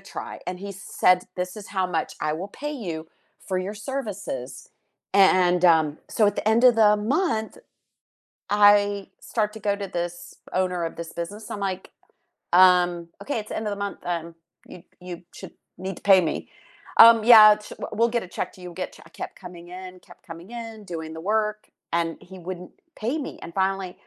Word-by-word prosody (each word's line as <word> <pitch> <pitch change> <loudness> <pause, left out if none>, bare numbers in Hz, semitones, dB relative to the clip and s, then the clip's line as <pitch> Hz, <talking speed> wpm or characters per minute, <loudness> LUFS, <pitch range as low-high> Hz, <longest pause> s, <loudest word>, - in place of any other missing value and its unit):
try," - - -8
and 180 0 -4
he 200 +1 -6
said, 180 -1 +2 0.2
"This 180 +3 -4
is 200 - -12
how 190 - +2
much - - -4
I 150 - 0
will 175 +5 -5
pay 295 +7 -6
you 170 - -6 0.4
for 185 - 0
your 190 +3 -4
services," 200 - -6 0.4
and, 185 -2 +4
um 160 -3 +4
So 215 - +2
at - - -3
the - - -4
end 235 - +2
of 245 -2 +7
the 210 -2 +5
month, 225 - -1 0.9
I 205 -1 +4
start 210 -2 -2
to 220 - -9
go 205 -1 0
to 200 -1 -5
this 175 -1 -3 0.5
owner 180 -2 -1
of 165 - -5
this 170 0 -8
business, 205 +6 -6
I'm 205 - -4
like, 185 0 -9 0.6
"Um, 175 -1 +5
okay, 280 -4 -2
it's 210 - -11
the - - -4
end 220 - -3
of - - -2
the 200 - -3
month, 200 - -8 0.2
um, 170 0 -6 0.4
you - - -9 0.3
you 180 - -5 0.2
should - - -10 0.2
need 190 -1 -5
to - - -22
pay 190 - +8
me," 160 - -1 0.7
"Um, 230 -1 +7
yeah, 225 -3 +10
sh 210 - -12
we'll - - -5
we'll 230 +2 +3
get 235 - +1
a - - -11
check 185 - -3
to - - -16
you, 180 - -8
get 185 +2 -5
a - - -27
check" - - -16
I - - -27
kept - - -6
coming 175 -1 -10
in, 185 0 -10
kept - - -17
coming 165 +5 -10
in, 220 -2 -10
doing 160 -1 -6
the 160 - -7
work, 215 -1 -1 0.2
and 170 0 +1 0.2
he 190 - -10
wouldn't 180 0 -7 0.3
pay 240 +8 -2
me, 290 - -6
and 170 - -8
finally, 190 -1 -1
190 Hz, 205 wpm, -24 LUFS, 175-210 Hz, 0.9 s, yeah